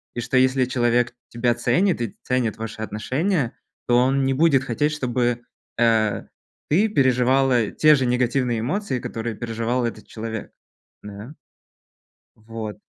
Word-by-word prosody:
И 120 - -2
что 120 +2 0
если 130 0 +3
человек 120 -1 +1 0.2
тебя 120 0 +1
ценит 175 +6 +1
и 115 -4 -4
ценит 125 -4 -1
ваши 115 0 -6
отношения, 125 - -1 0.4
то 120 - +4
он 135 +2 +3
не 135 - +1
будет 140 -2 +3
хотеть, 140 +4 0
чтобы, 120 -4 -1 0.4
э, 110 -3 +2 0.5
ты 195 +9 +3
переживала 130 - +2
те 155 -1 +5
же 135 -2 0
негативные 125 -1 0
эмоции, 140 - -2
которые 115 0 -5
переживал 115 +2 -2
этот 115 - -6
человек. 110 -1 -6 0.5
Да. 105 +7 -9 1.0
Вот. 110 -1 -7
120 Hz, 135 wpm, -23 LUFS, 115-135 Hz, 1.0 s, те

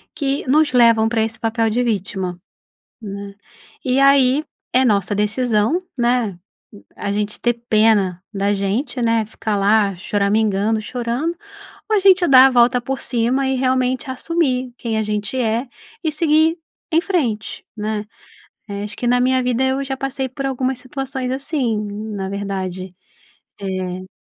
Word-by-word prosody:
que 275 -1 -1
nos 295 +1 +3
levam 230 -2 +5
pra 225 -1 0
esse 220 0 -4
papel 225 0 0
de 240 +3 0
vítima, 190 -5 -2 0.6
né, 200 -2 -7 0.5
e 255 +1 +1
aí, 275 +1 +5 0.3
é 260 +1 +4
nossa 205 -4 +2
decisão, 220 - +1 0.2
né, 240 -6 +1 0.3
u 100 - -15
a 200 - -3
gente 210 0 -2
ter 240 0 +2 0.2
pena 210 -5 +3
da 200 +1 +1
gente, 205 +7 -2
né, 230 -1 +2
ficar 215 0 -3
lá 200 -1 +3
choramingando, 205 +2 +1
chorando, 245 +8 -2 0.6
ou 435 - +4
a - - +5
gente 375 -2 +5
dá 260 -1 +9
a - - +4
volta 245 0 +4
por 265 +1 -4
cima, 255 +3 0
e 265 - +1
realmente 255 0 0
assumir 260 -3 -1
quem 225 -2 -2
a - - +1
gente 210 +3 -2
é, 230 +3 0 0.4
e 315 - 0
seguir 315 +1 +3 0.4
em 325 - +5
frente, 245 - -2
né, 210 0 -3 0.7
eh, 200 0 -4
acho 210 - -6
que 245 - -2
na 245 +1 +3
minha 255 +1 +2
vida 250 +1 +1
eu 265 +1 0
já 270 -1 -4
passei 270 -1 -3
por 270 +2 -5
algumas 265 -1 -1
situações 265 0 -4
assim, 265 -4 -1 0.4
na 190 -1 -3
verdade, 190 -2 -4 0.7
eh 185 -1 -4
235 Hz, 155 wpm, -20 LUFS, 205-265 Hz, 0.7 s, dá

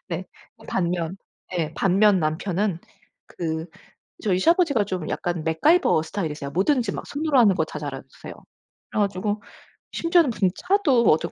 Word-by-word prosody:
네. - - -4 0.4
반면 175 -1 -1 0.4
예 160 -2 -1
반면 195 +1 +3
남편은 175 +4 -1 0.5
그 160 -1 -4 0.6
저희 185 -3 +1
시아버지가 325 - +3
좀 185 -5 -4
약간 175 -3 -2
맥가이버 160 - +3
스타일이세요. 155 -5 -4
뭐든지 230 - +1
막 - - -6
손으로 295 -1 0
하는 205 -5 +5
거 160 - +1
다 150 - -7
잘하세요. 135 -2 -8 0.6
그래 - - -1
가지고 205 +1 -1 0.5
심지어는 335 -4 +3
본인 190 -4 +1
차도 360 -11 +2
어뜩 155 - +2
190 Hz, 320 characters per minute, -24 LUFS, 160-235 Hz, 0.6 s, 하는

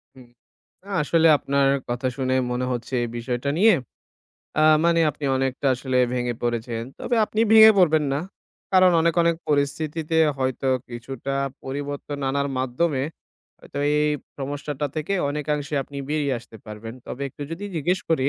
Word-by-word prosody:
হুম। 125 -2 -15 0.6
না, 200 - -14
আসলে 165 +2 +3
আপনার 140 0 +1 0.2
কথা 120 +2 -1
শুনে 130 -1 0 0.2
মনে 125 +1 -1
হচ্ছে 120 +1 -5
এই 120 - -3
বিষয়টা 120 +3 -2
নিয়ে 215 +4 +6 0.9
আ - - +4 0.2
মানে 170 0 +4
আপনি 145 0 -9
অনেকটা 135 +1 -1
আসলে 130 0 -1 0.2
ভেঙে 120 -1 -1
পড়েছেন। 120 -1 -2 0.2
তবে 240 - -1
আপনি 215 +1 -2
ভেঙে 220 0 +9
পড়বেন 160 -4 +4
না। 145 - -1 0.5
কারণ 185 -1 +6
অনেক 165 0 +2
অনেক 170 -1 +2
পরিস্থিতিতে 150 +2 -1 0.2
হয়তো 130 0 -1 0.2
কিছুটা 130 +3 -5 0.3
পরিবর্তন 145 +1 -5
আনার 140 0 0
মাধ্যমে 130 +2 0 0.6
হয়তো 140 - -9 0.2
এই - - +3 0.4
সমস্যাটা 145 +1 -3
থেকে 155 +6 -2 0.2
অনেকাংশে 150 0 -2
আপনি 140 +1 -12
বেরিয়ে 145 -3 0
আসতে 115 -1 -14
পারবেন। 110 +2 -8
তবে 140 - -6
একটু 145 - -9
যদি 170 +5 -5
জিজ্ঞেস 175 +5 0
করি 140 -4 +2
140 Hz, 150 wpm, -23 LUFS, 130-155 Hz, 0.9 s, ভেঙে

